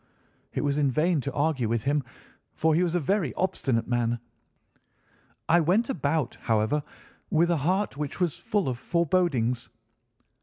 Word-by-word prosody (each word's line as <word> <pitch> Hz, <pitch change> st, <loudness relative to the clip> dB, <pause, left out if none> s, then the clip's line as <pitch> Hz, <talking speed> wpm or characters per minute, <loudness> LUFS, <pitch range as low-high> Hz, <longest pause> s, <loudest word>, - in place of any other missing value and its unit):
"It -, -, -2 dB
was 145 Hz, 0 st, 0 dB
in 145 Hz, -2 st, +3 dB
vain 155 Hz, +3 st, +2 dB
to 140 Hz, +1 st, -4 dB
argue 145 Hz, -6 st, 0 dB
with 115 Hz, -1 st, 0 dB
him, 145 Hz, +1 st, +1 dB, 0.5 s
for 160 Hz, 0 st, +2 dB
he 165 Hz, -, +3 dB
was 175 Hz, -1 st, +1 dB
a -, -, +3 dB
very 175 Hz, -1 st, 0 dB
obstinate 135 Hz, -10 st, 0 dB
man. 120 Hz, -1 st, 0 dB, 1.3 s
I 170 Hz, +2 st, +5 dB
went 190 Hz, -, +2 dB
about, 145 Hz, -, -1 dB
however, 110 Hz, +6 st, +1 dB, 0.5 s
with 170 Hz, +2 st, +3 dB
a 170 Hz, -, +2 dB
heart 185 Hz, +2 st, 0 dB
which 150 Hz, +2 st, -4 dB
was 175 Hz, -5 st, 0 dB
full 205 Hz, -6 st, 0 dB
of 125 Hz, -2 st, -2 dB
forebodings. 160 Hz, -9 st, +1 dB
150 Hz, 155 wpm, -27 LUFS, 130-175 Hz, 1.3 s, I